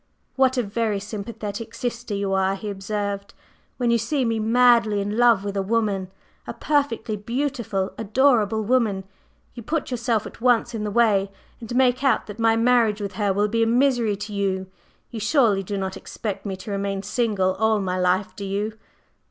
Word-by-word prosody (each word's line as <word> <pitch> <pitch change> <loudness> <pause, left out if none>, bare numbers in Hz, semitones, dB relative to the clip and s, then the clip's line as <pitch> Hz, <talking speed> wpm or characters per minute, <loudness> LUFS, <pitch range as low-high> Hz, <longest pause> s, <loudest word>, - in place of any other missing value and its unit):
"What 265 -1 +3
a 250 - +2
very 210 0 -1
sympathetic 210 +2 -6
sister 235 -3 -3
you 200 -1 -1
are!" 190 0 +1
he 205 +1 -5
observed. 200 0 -4 0.4
"When 245 -2 +1
you 235 - +3
see 260 +4 0
me 225 -1 0
madly 230 -1 +4
in 205 +1 -2
love 235 -4 +4
with 200 -1 -4
a 195 - +1
woman 200 -2 0 0.4
a - - -5
perfectly 280 -7 0
beautiful, 230 -3 -2
adorable 220 -1 +2
woman 215 -4 +1 0.5
you 240 - -8
put 300 +4 -3
yourself 235 -3 0
at - - -11
once 240 -1 +3
in 220 -2 -3
the 210 - -2
way 205 -3 +3 0.3
and 240 +1 -6
make 255 0 +3
out 270 - +2
that 210 +1 -9
my 225 0 +4
marriage 230 -2 +3
with 200 -2 -4
her 205 -2 0
will 205 +2 +1
be 230 +2 0
a 225 - +3
misery 240 -3 +2
to 210 +1 -7
you. 190 -2 -1 0.5
You 230 - -5
surely 215 -3 +3
do 200 +1 -4
not 190 -1 -3
expect 210 -2 -6
me 195 - -3
to 190 +3 -8
remain 200 0 -2
single 205 -3 0
all 220 +2 +2
my 185 -2 -2
life, 185 +1 +1
do 200 - -7
you?" 205 +3 -3
215 Hz, 185 wpm, -23 LUFS, 200-235 Hz, 0.5 s, madly